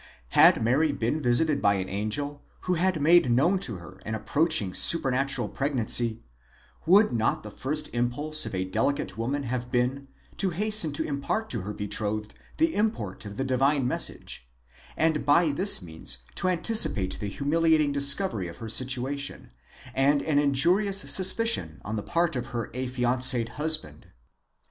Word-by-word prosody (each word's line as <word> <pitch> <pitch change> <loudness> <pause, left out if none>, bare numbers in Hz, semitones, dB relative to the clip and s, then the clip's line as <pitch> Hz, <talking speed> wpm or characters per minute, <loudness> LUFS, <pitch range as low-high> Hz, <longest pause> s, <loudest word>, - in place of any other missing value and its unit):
Had - - +5
Mary 140 +7 +2
been 140 +3 -2
visited 140 +4 +1
by 100 0 +3
an 95 -1 -3
angel, 140 +9 -4 0.2
who 185 - -1
had 180 -1 0
made 160 -2 +4
known 155 +11 +2
to 115 - -3
her 90 +1 -12
an 110 - -4
approaching 145 - 0
supernatural 135 - +3
pregnancy, 120 -4 -1 0.6
would 200 - +5
not 110 -1 -1
the 105 - -9
first 150 +7 -4
impulse 145 +6 -1
of - - -6
a 95 0 -2
delicate 110 +4 -2
woman 130 +6 -3
have 125 -1 -4
been, 125 +3 -1 0.3
to 195 - 0
hasten 205 -2 +3
to 160 +2 -2
impart 145 +10 -3
to 115 - -2
her 100 +3 -6
betrothed 105 +1 -4 0.2
the 325 0 +1
import 115 - -3
of 100 0 -10
the - - -1
divine 135 +1 +1
message, - - -3 0.5
and 160 -1 +1
by 150 +3 +3
this 180 - +2
means 80 -2 -7 0.2
to - - -2
antici 185 +5 +3
pate 95 -3 -3
the 105 - -4
humiliating 155 +5 +1
discovery 140 - +4
of 85 - -10
her 115 - -8
situation, 130 +3 -2 0.4
and 140 +2 +2
an 150 -2 +1
injurious 175 +9 +2
suspicion 190 - +2
on 110 +3 -4
the 105 - -3
part 170 +6 -1
of 125 -1 -4
her 120 -3 -5
affianced 125 0 +2
husband. 150 - -3
135 Hz, 160 wpm, -26 LUFS, 115-160 Hz, 0.6 s, Had